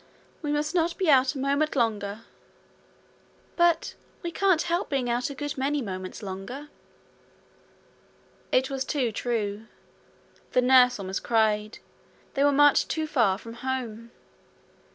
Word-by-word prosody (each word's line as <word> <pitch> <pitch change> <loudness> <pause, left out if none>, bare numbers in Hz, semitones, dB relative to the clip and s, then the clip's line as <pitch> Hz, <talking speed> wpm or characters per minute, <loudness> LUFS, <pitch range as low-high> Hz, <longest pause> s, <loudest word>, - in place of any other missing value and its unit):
'We 295 -2 -2
must 300 +2 -1
not 335 -1 +1
be 365 -5 +3
out 265 +1 +4
a - - -4
moment 280 +3 0
longer.' 215 -4 -1 1.3
'But 345 -1 +2 0.3
we 340 - -3
can't 370 -2 +2
help 345 +2 -1
being 255 -4 0
out 245 +3 -1
a 280 - -7
good 290 +1 -4
many 285 +2 0
moments 185 -5 -6
longer.' 200 +10 -7 1.8
It 260 +1 +2
was 270 -1 -2
too 265 -5 -1
true. 215 -1 -3 0.9
The 250 - +4
nurse 250 -1 +6
almost 190 -1 -4
cried. 215 -1 +1 0.6
They 275 - +1
were 285 - +5
much 290 0 +5
too 315 -1 -2
far 235 -11 +2
from 230 +2 -10
home. 235 -3 -4
260 Hz, 135 wpm, -26 LUFS, 220-295 Hz, 1.8 s, nurse